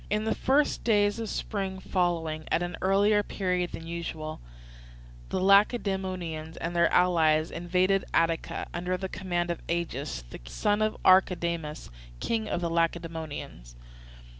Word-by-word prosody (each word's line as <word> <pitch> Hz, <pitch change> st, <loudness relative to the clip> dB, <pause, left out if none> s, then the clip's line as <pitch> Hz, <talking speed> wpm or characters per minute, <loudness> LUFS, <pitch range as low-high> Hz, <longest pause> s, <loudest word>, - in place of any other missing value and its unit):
In 210 Hz, +1 st, 0 dB
the 220 Hz, -, +1 dB
first 285 Hz, +3 st, +1 dB
days 205 Hz, -1 st, +2 dB
of 225 Hz, -, -2 dB
the -, -, -6 dB
spring 195 Hz, -3 st, -3 dB
following, 165 Hz, -4 st, -1 dB
at 175 Hz, -, +2 dB
an 175 Hz, 0 st, -4 dB
earlier 205 Hz, +2 st, +4 dB
period 180 Hz, -3 st, -1 dB
than 165 Hz, -, -7 dB
usual, 165 Hz, -2 st, -5 dB, 0.9 s
the -, -, -1 dB
Lacedaemonians 190 Hz, -5 st, +1 dB
and 170 Hz, +1 st, -4 dB
their 170 Hz, 0 st, +4 dB
allies 160 Hz, -3 st, +3 dB
invaded 180 Hz, +3 st, +1 dB
Attica, 165 Hz, 0 st, 0 dB
under 180 Hz, +1 st, -2 dB
the 190 Hz, -, -4 dB
command 175 Hz, -2 st, -2 dB
of 170 Hz, -, -5 dB
Agis, 140 Hz, -, -3 dB, 0.2 s
son -, -, 0 dB
of 215 Hz, 0 st, 0 dB
Archidamus, 170 Hz, -, +2 dB, 0.3 s
king 220 Hz, -2 st, -1 dB
of 175 Hz, -, -1 dB
the 170 Hz, -, -1 dB
Lacedaemonians. 160 Hz, -, -3 dB
175 Hz, 140 wpm, -28 LUFS, 165-195 Hz, 0.9 s, earlier